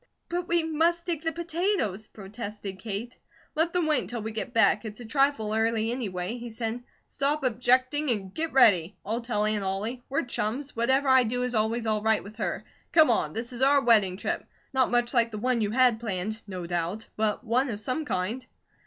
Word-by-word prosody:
"But 350 Hz, 0 st, -2 dB
we 340 Hz, -1 st, +2 dB
must 330 Hz, +2 st, +1 dB
dig 335 Hz, -4 st, -2 dB
the 325 Hz, 0 st, -1 dB
potatoes," 335 Hz, -, -1 dB
protested 205 Hz, -1 st, -8 dB
Kate. 225 Hz, +3 st, -5 dB, 0.4 s
"Let 325 Hz, +2 st, +1 dB
them 355 Hz, -2 st, +1 dB
wait 310 Hz, -1 st, +2 dB
until 220 Hz, +4 st, -5 dB
we 220 Hz, -, -4 dB
get 220 Hz, +2 st, -4 dB
back; 230 Hz, 0 st, +3 dB
it's 215 Hz, 0 st, -7 dB
a 240 Hz, -, -8 dB
trifle 270 Hz, -3 st, +1 dB
early, 225 Hz, 0 st, +1 dB
anyway," 210 Hz, -3 st, -3 dB
he 240 Hz, 0 st, -7 dB
said. 225 Hz, +1 st, -4 dB, 0.2 s
"Stop 285 Hz, +1 st, 0 dB
objecting 255 Hz, +4 st, +2 dB
and 195 Hz, -5 st, -2 dB
get 325 Hz, 0 st, -2 dB
ready! 205 Hz, -8 st, +5 dB
I'll 225 Hz, +4 st, -2 dB
tell 220 Hz, -3 st, 0 dB
Aunt 215 Hz, -1 st, 0 dB
Ollie. 205 Hz, +6 st, -3 dB
We're 275 Hz, -, 0 dB
chums. 245 Hz, +4 st, -3 dB
Whatever 265 Hz, +4 st, +2 dB
I 260 Hz, -1 st, +6 dB
do 245 Hz, +1 st, -1 dB
is 250 Hz, -1 st, -2 dB
always 225 Hz, +1 st, 0 dB
all 215 Hz, -1 st, +1 dB
right 220 Hz, 0 st, +2 dB
with 210 Hz, +2 st, -12 dB
her. 220 Hz, -, -2 dB, 0.3 s
Come 315 Hz, -6 st, +6 dB
on! 230 Hz, -, 0 dB
This 235 Hz, +3 st, -4 dB
is 240 Hz, -, -6 dB
our 280 Hz, +2 st, +6 dB
wedding 215 Hz, -8 st, +4 dB
trip. -, -, -2 dB, 0.3 s
Not 260 Hz, -1 st, +3 dB
much 240 Hz, +1 st, +1 dB
like 235 Hz, -2 st, +3 dB
the 215 Hz, -, -6 dB
one 245 Hz, +1 st, 0 dB
you 210 Hz, -, +1 dB
had 245 Hz, 0 st, +3 dB
planned, 215 Hz, 0 st, -3 dB
no 185 Hz, -3 st, -5 dB
doubt, 175 Hz, +5 st, -3 dB
but 215 Hz, +1 st, 0 dB
one 250 Hz, +3 st, +1 dB
of 210 Hz, -3 st, -4 dB
some 255 Hz, +8 st, -2 dB
kind." 220 Hz, 0 st, -2 dB
235 Hz, 205 wpm, -27 LUFS, 215-265 Hz, 0.4 s, I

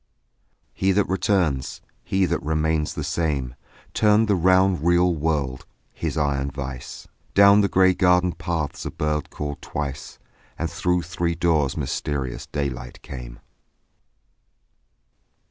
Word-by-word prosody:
He 95 Hz, 0 st, +1 dB
that 105 Hz, +1 st, +2 dB
returns, 90 Hz, -, 0 dB, 0.2 s
He 95 Hz, 0 st, +1 dB
that 85 Hz, -1 st, -1 dB
remains 80 Hz, 0 st, 0 dB
the -, -, -3 dB
same, 70 Hz, -7 st, -1 dB, 0.4 s
Turned 105 Hz, +1 st, +4 dB
the 105 Hz, -, +3 dB
round 95 Hz, -2 st, +3 dB
real 85 Hz, +1 st, +3 dB
world, 75 Hz, -5 st, -2 dB, 0.3 s
His -, -, -3 dB
iron 70 Hz, -2 st, 0 dB
vice; 70 Hz, -2 st, -7 dB, 0.3 s
Down 100 Hz, +1 st, +7 dB
the 100 Hz, -, +3 dB
grey 95 Hz, 0 st, +4 dB
garden 90 Hz, 0 st, +3 dB
paths 85 Hz, -4 st, -3 dB
a -, -, -3 dB
bird 75 Hz, -1 st, -2 dB
called 75 Hz, -1 st, -5 dB
twice, 75 Hz, -1 st, -5 dB, 0.4 s
And 80 Hz, 0 st, -3 dB
through 90 Hz, -1 st, 0 dB
three 85 Hz, 0 st, -2 dB
doors 80 Hz, -5 st, +1 dB
mysterious 70 Hz, -2 st, -3 dB
daylight 65 Hz, -4 st, -5 dB
came. -, -, -9 dB
80 Hz, 125 wpm, -23 LUFS, 70-90 Hz, 0.4 s, Down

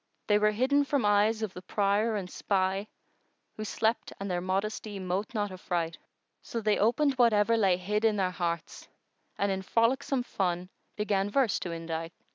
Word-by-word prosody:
They 210 Hz, -1 st, +3 dB
were 210 Hz, 0 st, +4 dB
hidden 260 Hz, +7 st, +2 dB
from 280 Hz, -5 st, 0 dB
eyes 210 Hz, +2 st, +3 dB
of 205 Hz, -4 st, -3 dB
the 180 Hz, -, -8 dB
prier 205 Hz, +3 st, +1 dB
and 195 Hz, -3 st, -3 dB
spy 195 Hz, +1 st, -1 dB, 0.3 s
* -, -, -46 dB
Who 215 Hz, -, -5 dB
slept 220 Hz, +2 st, -1 dB
and 195 Hz, -1 st, -3 dB
their 175 Hz, -1 st, -1 dB
modesty 200 Hz, +3 st, -2 dB
mote 190 Hz, +4 st, -3 dB
not 205 Hz, -2 st, -1 dB
affright; 175 Hz, -3 st, -3 dB, 0.4 s
So 230 Hz, -, -4 dB
they 215 Hz, -1 st, +1 dB
opened 270 Hz, +7 st, +3 dB
whatever 230 Hz, -1 st, +4 dB
lay 195 Hz, -5 st, +3 dB
hid 210 Hz, +4 st, -1 dB
in 220 Hz, -2 st, +4 dB
their 190 Hz, -2 st, +1 dB
hearts 170 Hz, -2 st, -4 dB, 0.2 s
* -, -, -42 dB
And 200 Hz, 0 st, +1 dB
in 190 Hz, 0 st, -1 dB
frolicsome 250 Hz, +6 st, +1 dB
fun 180 Hz, -5 st, -2 dB, 0.3 s
began 205 Hz, -2 st, 0 dB
verse 240 Hz, -1 st, +2 dB
to 175 Hz, -, -4 dB
indite. 165 Hz, 0 st, -4 dB
205 Hz, 180 wpm, -29 LUFS, 185-220 Hz, 0.4 s, were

